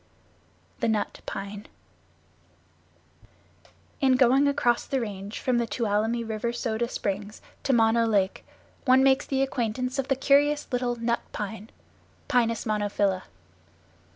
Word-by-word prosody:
The 235 Hz, -, 0 dB
Nut 220 Hz, -2 st, -1 dB
Pine 200 Hz, +1 st, -6 dB, 2.3 s
In 265 Hz, -2 st, +4 dB
going 265 Hz, +2 st, +4 dB
across 245 Hz, -4 st, +1 dB
the 270 Hz, -, 0 dB
Range 205 Hz, -2 st, -5 dB
from 250 Hz, -2 st, +1 dB
the 235 Hz, -, -1 dB
Tuolumne 225 Hz, +1 st, 0 dB
River 220 Hz, +1 st, -2 dB
Soda 235 Hz, -1 st, -2 dB
Springs 205 Hz, +1 st, -4 dB, 0.2 s
to 275 Hz, -, 0 dB
Mono 230 Hz, -1 st, +3 dB
Lake 195 Hz, -3 st, +1 dB, 0.4 s
one 260 Hz, 0 st, +5 dB
makes 265 Hz, 0 st, +3 dB
the 270 Hz, -1 st, +1 dB
acquaintance 255 Hz, +1 st, -2 dB
of 270 Hz, -, -1 dB
the 270 Hz, -, +2 dB
curious 285 Hz, +2 st, +3 dB
little 245 Hz, -1 st, 0 dB
Nut 235 Hz, 0 st, -1 dB
Pine 215 Hz, +1 st, -5 dB, 0.6 s
(Pinus 230 Hz, -3 st, +1 dB
monophylla). 205 Hz, -3 st, 0 dB
235 Hz, 125 wpm, -26 LUFS, 210-255 Hz, 2.3 s, one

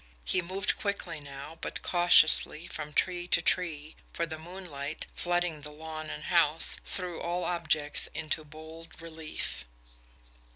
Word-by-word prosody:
He 185 Hz, -, +1 dB
moved 190 Hz, +3 st, -1 dB
quickly 195 Hz, -6 st, -2 dB
now, 140 Hz, +3 st, -9 dB
but -, -, -5 dB
cautiously, 175 Hz, -2 st, +6 dB
from 150 Hz, -4 st, -7 dB
tree 175 Hz, +2 st, 0 dB
to -, -, +4 dB
tree, 155 Hz, -4 st, 0 dB, 0.2 s
for 170 Hz, -, -1 dB
the 160 Hz, -1 st, -7 dB
moonlight, 160 Hz, -4 st, -5 dB
flooding 175 Hz, -3 st, -1 dB
the 150 Hz, -, -6 dB
lawn 155 Hz, +1 st, -7 dB
and 150 Hz, -, -6 dB
house, 165 Hz, -2 st, +4 dB
threw 180 Hz, -3 st, -4 dB
all 175 Hz, +1 st, -2 dB
objects 155 Hz, -4 st, 0 dB
into 155 Hz, 0 st, -2 dB
bold 160 Hz, +2 st, -12 dB
relief. 160 Hz, -, -6 dB
160 Hz, 135 wpm, -29 LUFS, 155-175 Hz, 0.2 s, cautiously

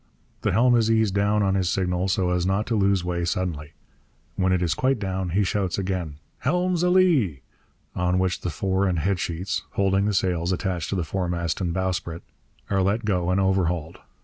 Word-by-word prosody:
The -, -, +1 dB
helm 120 Hz, +5 st, +4 dB
is 115 Hz, -2 st, +2 dB
eased 110 Hz, -3 st, +2 dB
down 100 Hz, +1 st, +2 dB
on 95 Hz, -1 st, +2 dB
his 95 Hz, -3 st, +1 dB
signal, 90 Hz, 0 st, 0 dB
so 90 Hz, -1 st, +1 dB
as 90 Hz, -1 st, +1 dB
not 95 Hz, +3 st, 0 dB
to 115 Hz, -, -1 dB
lose 100 Hz, -3 st, +2 dB
way 85 Hz, -1 st, -2 dB
suddenly. 85 Hz, -5 st, -3 dB, 0.6 s
When 95 Hz, 0 st, +1 dB
it 90 Hz, -1 st, +1 dB
is 85 Hz, -, +1 dB
quite 130 Hz, 0 st, +1 dB
down 95 Hz, -3 st, -3 dB
he 100 Hz, +5 st, +1 dB
shouts 95 Hz, -1 st, -1 dB
again, 90 Hz, -6 st, -3 dB, 0.2 s
'Helm's 180 Hz, +5 st, 0 dB
a 180 Hz, -, +3 dB
lee!' 155 Hz, -, +3 dB, 0.5 s
on 90 Hz, 0 st, +1 dB
which 95 Hz, -1 st, 0 dB
the 90 Hz, -, -2 dB
fore 95 Hz, +4 st, 0 dB
and 90 Hz, -2 st, 0 dB
head 95 Hz, +4 st, 0 dB
sheets 85 Hz, +2 st, -2 dB
(holding 100 Hz, 0 st, +2 dB
the 105 Hz, -1 st, 0 dB
sails 90 Hz, -2 st, 0 dB
attached 90 Hz, -3 st, -2 dB
to -, -, -1 dB
the 90 Hz, -, 0 dB
foremast 85 Hz, 0 st, -2 dB
and 90 Hz, -2 st, -1 dB
bowsprit) 90 Hz, -2 st, -3 dB, 0.5 s
are 95 Hz, -1 st, +2 dB
let 105 Hz, +4 st, 0 dB
go 90 Hz, -4 st, 0 dB
and 90 Hz, +1 st, +2 dB
overhauled. 90 Hz, -4 st, 0 dB
95 Hz, 200 wpm, -24 LUFS, 90-100 Hz, 0.6 s, helm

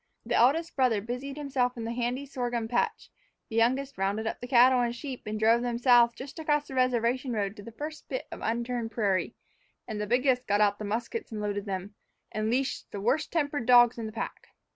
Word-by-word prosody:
The -, -, -2 dB
eldest 320 Hz, +8 st, +3 dB
brother 250 Hz, -6 st, +3 dB
busied 250 Hz, +6 st, -5 dB
himself 265 Hz, -4 st, -1 dB
in 230 Hz, -, -4 dB
the 225 Hz, -, -3 dB
handy 245 Hz, +3 st, -2 dB
sorghum 245 Hz, -4 st, -3 dB
patch; 240 Hz, +1 st, -1 dB, 0.4 s
the 225 Hz, -, -6 dB
youngest 260 Hz, +2 st, +1 dB
rounded 200 Hz, +3 st, 0 dB
up 220 Hz, -, -3 dB
the 245 Hz, -, -6 dB
cattle 250 Hz, 0 st, +6 dB
and 240 Hz, 0 st, -1 dB
sheep 255 Hz, -3 st, -7 dB
and 215 Hz, 0 st, -3 dB
drove 225 Hz, +2 st, +4 dB
them 240 Hz, -1 st, -1 dB
south 240 Hz, -1 st, +5 dB
just 270 Hz, +6 st, -9 dB
across 295 Hz, -2 st, 0 dB
the -, -, -9 dB
reservation 255 Hz, 0 st, +1 dB
road 200 Hz, -2 st, -1 dB
to -, -, -8 dB
the 230 Hz, -, -10 dB
first 305 Hz, +6 st, -7 dB
bit -, -, -3 dB
of -, -, -8 dB
unturned 235 Hz, 0 st, -2 dB
prairie; 205 Hz, -2 st, 0 dB, 0.5 s
and 215 Hz, -3 st, -4 dB
the 210 Hz, -, -2 dB
biggest 250 Hz, +2 st, +2 dB
got 205 Hz, +1 st, +2 dB
out 205 Hz, -1 st, +3 dB
the 210 Hz, -, -4 dB
muskets 230 Hz, -, -3 dB
and 215 Hz, -, -4 dB
loaded 205 Hz, -1 st, -2 dB
them, 195 Hz, +1 st, -4 dB, 0.4 s
and 215 Hz, +1 st, -1 dB
leashed 260 Hz, +3 st, -1 dB
the 205 Hz, -, -6 dB
worst 245 Hz, +9 st, 0 dB
tempered 290 Hz, -6 st, -1 dB
dogs 240 Hz, -1 st, +6 dB
in 225 Hz, -, -3 dB
the -, -, -6 dB
pack. 220 Hz, -, -6 dB
240 Hz, 215 wpm, -28 LUFS, 220-260 Hz, 0.5 s, cattle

